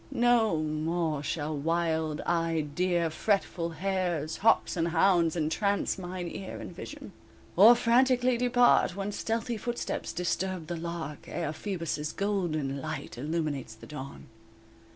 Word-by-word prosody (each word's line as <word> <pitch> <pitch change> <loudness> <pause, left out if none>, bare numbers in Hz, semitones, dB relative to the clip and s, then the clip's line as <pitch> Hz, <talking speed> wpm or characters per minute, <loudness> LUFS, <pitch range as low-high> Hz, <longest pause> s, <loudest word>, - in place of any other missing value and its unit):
No 240 - +3
more 155 0 -1
shall 150 +1 -2
wild 160 0 0
eyed 165 -3 0
deer, 175 -1 +1
Fretful 175 -1 0
hares, 175 -2 -2
hawks 225 -1 +3
and 170 -1 +1
hounds 170 -1 +3
Entrance 195 +6 0
mine 180 -1 -5
ear 190 +3 -6
and 175 - -8
vision, 285 - -8 0.4
Or 220 +7 +9
frantically 250 +1 +3
depart 245 -6 +4
when 200 +1 -3
Stealthy 230 +2 -2
footsteps 240 +3 -3
disturb 180 0 -2
the 175 - -4
lark, 165 -3 -6
Ere 165 -3 -3
Phoebus' 165 -5 -3
golden 160 -9 -1
light 155 -1 -5
Illuminates 145 -3 -3
the 110 - -13
dawn. 140 -2 -8
170 Hz, 130 wpm, -29 LUFS, 155-200 Hz, 0.4 s, Or